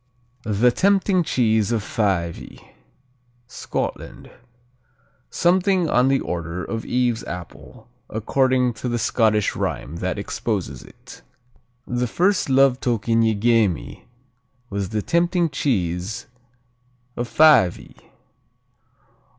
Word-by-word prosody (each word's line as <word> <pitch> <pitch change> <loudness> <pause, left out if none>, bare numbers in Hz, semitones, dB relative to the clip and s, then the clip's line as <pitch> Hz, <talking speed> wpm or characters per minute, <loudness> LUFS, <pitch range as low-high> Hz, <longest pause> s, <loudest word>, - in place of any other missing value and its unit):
"The 110 +4 +3
Tempting 195 - +2
cheese 110 - +1
of 115 -3 0
Fyvie" 95 -7 -3 0.8
Scotland 125 - -5 1.0
Something 180 -1 +2
on 125 +1 +3
the 135 0 +2
order 85 +1 -4
of 115 -1 -4
Eve's 125 -2 0
apple, 90 +4 -10 0.2
according 125 +3 +1
to 125 - -2
the 120 - -1
Scottish 110 -3 +1
rhyme 80 +5 -4
that 90 +3 -3
exposes 100 - -4
it: - - -15 0.6
The 125 0 -2
first 185 - +1
love 135 -1 +4
token 115 -2 0
ye 110 -1 +2
gae 115 +1 +3
me 90 - -7 0.7
Was 100 -1 -3
the 105 -1 -2
tempting 170 -1 +1
cheese 100 - -2 0.9
of 120 - -3
Fyvie. 150 - +3
115 Hz, 105 wpm, -22 LUFS, 100-135 Hz, 1.0 s, love